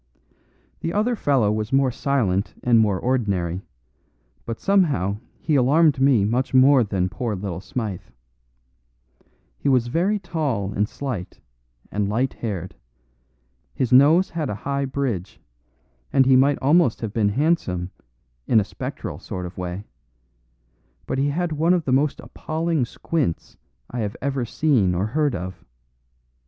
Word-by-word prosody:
"The 165 - -3
other 225 +4 +1
fellow 135 - +2
was 110 0 -2
more 135 -1 +3
silent 115 -8 0
and 120 -2 +4
more 105 -4 +2
ordinary; 100 -9 -1 0.9
but 115 -1 -4
somehow 150 - +2 0.2
he 160 - -1
alarmed 145 +1 +4
me 130 -7 +4
much 125 +5 0
more 130 0 +6
than 95 -4 -1
poor 110 +3 -3
little 95 -2 -5
Smythe. 105 -1 -4 1.6
He 145 - 0
was 125 -3 +2
very 180 - +1
tall 145 - -2
and 105 +2 0
slight, 120 -11 -5 0.5
and 100 -1 -1
light 125 +5 0
haired; 95 -6 -5 1.0
his 125 -2 0
nose 155 +8 +6
had 160 -4 -3
a 105 - -2
high 140 0 0
bridge, 130 -9 -3 0.7
and 135 -1 +4
he 130 0 +5
might 140 +2 +4
almost 150 -3 +3
have 110 -3 -4
been 105 -3 +2
handsome 100 - 0 0.6
in 115 - +5
a - - +2
spectral 95 -2 -6
sort 90 -1 -6
of 90 - -8
way; 90 +1 -5 1.2
but 130 - -2
he 140 +1 +2
had 170 +3 -1
one 165 +4 +2
of 170 -3 -2
the 130 - -1
most 140 +2 +1
appalling 160 -3 -2
squints 140 - -3 0.4
I 125 - -4
have 105 0 -3
ever 135 -2 -2
seen 115 - +1
or 95 +3 0
heard 145 +3 0
of. 90 -1 -6
125 Hz, 145 wpm, -23 LUFS, 100-145 Hz, 1.6 s, more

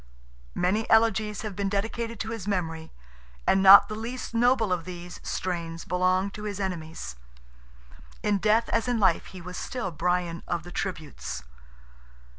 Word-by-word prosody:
Many 195 +5 +1
elegies 220 -1 +3
have 210 -3 -5
been 200 0 -1
dedicated 225 +3 -2
to 220 - -4
his 220 -4 -5
memory, 165 -5 -2 0.5
and 190 - +4
not 195 +1 +10
the 215 - -5
least 230 +3 -5
noble 235 -4 +3
of 175 -2 -2
these 175 0 -8
strains 170 -2 -4
belong 185 +2 +1
to 210 - -9
his 205 -1 -4
enemies. 165 - -4 1.1
In 205 -1 +2
death 220 +3 +3
as 230 +1 +1
in 245 -2 +1
life 190 -5 +3
he 185 - -10
was 180 +1 -7
still 245 -8 -4
Brian 175 +1 -1
"of 170 -2 -2
the 175 - -10
tributes." 150 - -5
190 Hz, 155 wpm, -27 LUFS, 175-220 Hz, 1.1 s, not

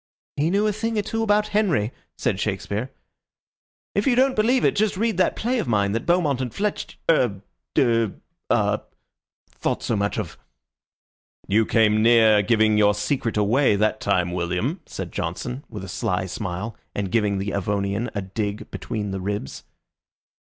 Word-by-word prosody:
"He 150 +3 +1
knew 200 +4 +2
a 210 - +2
thing 225 +1 -2
or 210 - +1
two 225 +3 -2
about 210 -1 +2
Henry," 180 - +1 0.3
said - - -1
Shakespeare. 110 +6 -2 1.0
"If 200 - 0
you 255 - +4
don't 260 +1 +3
believe 240 +4 +3
it, - - +3
just 205 -2 +1
read 225 -2 0
that 185 - +2
play 245 +2 0
of - - -2
mine 100 -3 +2
that 115 +2 -3
Beaumont 160 -7 +2
and 125 -3 -3
Fletcher 205 - -3
er 115 -3 +1 0.3
ah - - +2 0.7
thought - - -2
so 115 - 0
much 100 0 -1
of." 105 -7 -5 1.1
"You 110 +3 +3
came 110 -2 +3
near 110 -2 +6
giving 110 0 +3
your 105 -1 +4
secret 115 +1 -1
away 105 +3 +3
that 110 +1 +1
time, 90 -3 +1
William," 90 - -1
said 90 -3 -6
Johnson, 125 - -4
with 105 -3 -7
a - - -6
sly 90 +1 -1
smile, 95 +3 -4 0.2
and 100 -2 -2
giving 105 -3 +1
the 100 +1 -2
Avonian 100 +4 -1
a 100 - -2
dig 100 +2 -4
between 105 -3 -4
the 95 -1 -4
ribs. 100 -8 -4
110 Hz, 165 wpm, -23 LUFS, -, 1.1 s, near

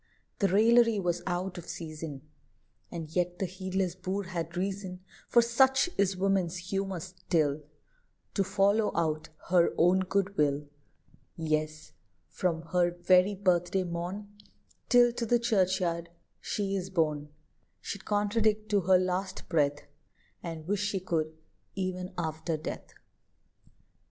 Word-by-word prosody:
The 200 - +3
raillery 225 +3 +5
was 175 -2 -1
out 180 +1 -2
of 170 - -11
season; 155 -4 -6 0.7
And 165 -3 -6
yet 175 0 0
the 190 - -1
heedless 185 0 -2
boor 185 +2 -3
had 170 -2 -5
reason, 190 -1 -3 0.3
For 235 - +5
such 265 +7 +3
is 195 -1 +1
woman's 190 -2 +1
humour 190 +1 -3
still, 165 -5 -1 0.7
To 200 - +2
follow 200 +3 +2
out 155 -1 0 0.2
her 175 -1 +4
own 180 +3 +5
good 195 +1 0
will; 145 0 +2 0.7
Yes, 155 -2 -2 0.4
from 165 -3 -1
her 180 -1 +3
very 180 +3 +3
birthday 185 -1 +1
morn 180 +4 -5 0.5
Till 245 -1 +6
to 240 - -3
the 240 - +4
churchyard 185 -7 +1 0.3
she 195 -1 -2
is 190 -1 -3
borne, 155 -5 0 0.5
She'd 200 - -6
contradict 210 +1 +1
to 205 -1 +3
her 185 +1 +5
last 185 +1 -2
breath, 145 -3 +1 0.6
And 165 -2 -6
wish 205 +1 0
she 205 -1 0
could 160 -4 -1 0.5
e'en 185 -1 -3
after 160 -1 -2
death. 155 - -6
185 Hz, 130 wpm, -30 LUFS, 170-200 Hz, 0.7 s, Till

